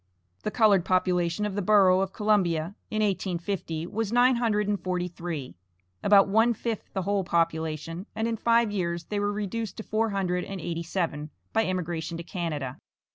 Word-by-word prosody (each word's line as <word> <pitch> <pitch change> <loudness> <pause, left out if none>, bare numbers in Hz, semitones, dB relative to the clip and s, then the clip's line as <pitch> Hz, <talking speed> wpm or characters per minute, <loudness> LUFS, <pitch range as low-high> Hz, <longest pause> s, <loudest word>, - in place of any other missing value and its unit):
The - - -2
colored 210 -5 +4
population 180 +1 +1
of 210 - -2
the 205 - -1
Borough 190 -2 +5
of 195 0 -1
Columbia, 190 -6 +1 0.2
in 215 -1 0
1850, 180 -4 -2
was 215 +3 -3
nine 245 +1 +5
hundred 210 -3 +1
and 205 -4 -1
forty 180 -1 -1
three, 165 -6 -6 0.5
about 200 -1 +6
one 225 +4 +3
fifth 225 0 -4
the 190 - -1
whole 200 +1 +1
population, 165 +1 -1
and 220 +1 0
in 230 - 0
five 230 0 +3
years 170 -4 -2
they 205 +4 -3
were 205 0 0
reduced 210 0 -3
to 220 - -5
four 220 +1 0
hundred 180 -3 -1
and 195 -1 -6
eighty 170 0 -3
seven 165 -4 -2 0.2
by 225 -2 +2
emigration 170 -2 -3
to 170 - -6
Canada. 155 -7 -4
190 Hz, 180 wpm, -27 LUFS, 170-210 Hz, 0.5 s, about